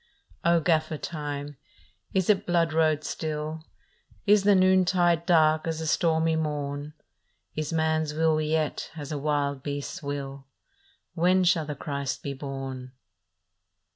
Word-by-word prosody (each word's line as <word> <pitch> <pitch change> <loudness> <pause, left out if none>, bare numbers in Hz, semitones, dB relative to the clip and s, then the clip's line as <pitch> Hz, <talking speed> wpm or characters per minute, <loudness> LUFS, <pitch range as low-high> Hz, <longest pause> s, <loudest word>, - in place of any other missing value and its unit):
" - - -31
O 170 - +5
Gaffer 155 -1 +1
Time, 145 -2 -5 0.5
is 190 -2 +1
it 210 -3 +2
blood 170 -2 +2
road 155 -1 +2
still? 155 0 -4 0.6
Is 205 -1 +4
the 205 -1 +6
noontide 185 -2 +3
dark 155 -2 +4
as 160 -1 -1
the 160 - -4
stormy 160 0 +2
morn? 150 -1 -3 0.6
Is 155 0 -3
man 160 -1 +1
s 150 -1 -3
will 155 0 +2
yet 155 0 -1
as 145 0 -6
a 150 - -2
wild 145 -2 -1
beast 145 0 -4
s - - -20
will? 140 -1 -5 0.7
When 180 +3 +3
shall 170 -3 +3
the 150 - -4
Christ 140 0 -4
be 140 - -3
born? 135 -2 -6
155 Hz, 145 wpm, -27 LUFS, 145-165 Hz, 0.7 s, the